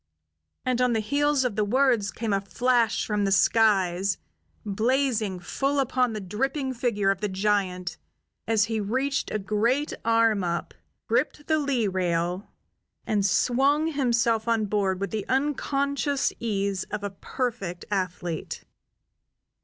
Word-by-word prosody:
And 250 -1 +1
on 250 -1 +3
the 225 - +1
heels 285 +5 +1
of 235 -5 -1
the 215 - +1
words 235 -2 +2
came 220 -2 -3
a 195 - +1
flash 235 +2 +1
from 210 -1 0
the 195 - +1
skies, 195 -3 +3 0.5
blazing 220 -2 0
full 275 +10 -1
upon 255 -2 +1
the 215 - -3
dripping 260 +8 -2
figure 230 -5 +1
of 195 0 -4
the 210 - -1
giant 190 -2 -1 0.5
as 220 -2 +3
he 225 +1 -1
reached 260 +7 -1
a - - -1
great 220 +8 0
arm 225 -3 +3
up, 170 -1 -2 0.3
gripped 265 +5 0
the 315 -1 +2
lee 270 -7 0
rail, 180 0 -1 0.6
and 210 -2 +1
swung 270 +10 +2
himself 235 -4 +1
on 225 -2 +2
board 195 -2 0
with 200 -2 -3
the 215 -2 -2
unconscious 280 +1 0
ease 200 -4 -1
of 205 - -5
a 205 - -3
perfect 200 -4 -4
athlete. 180 -4 -3
220 Hz, 140 wpm, -26 LUFS, 195-255 Hz, 0.6 s, on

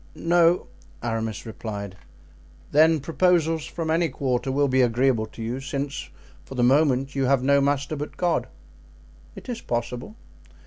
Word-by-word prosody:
"No," 170 +1 +3 0.4
Aramis 115 -2 -3
replied. 105 -3 -6 0.8
"Then 160 +1 +5
proposals 165 0 +1
from 165 -2 -3
any 165 0 +2
quarter 130 -1 -1
will 140 +1 +2
be 130 0 +3
agreeable 120 -1 +2
to 115 - -9
you, 120 +3 -3
since 140 +1 -4 0.3
for 135 - -10
the 125 - +1
moment 135 0 +3
you 135 -1 0
have 130 -1 +2
no 140 +1 +4
master 145 +2 0
but 150 +1 -6
God?" 175 -2 0 0.9
"It - - -11
is 245 -2 -4
possible." 120 - -4
135 Hz, 145 wpm, -24 LUFS, 125-160 Hz, 0.9 s, Then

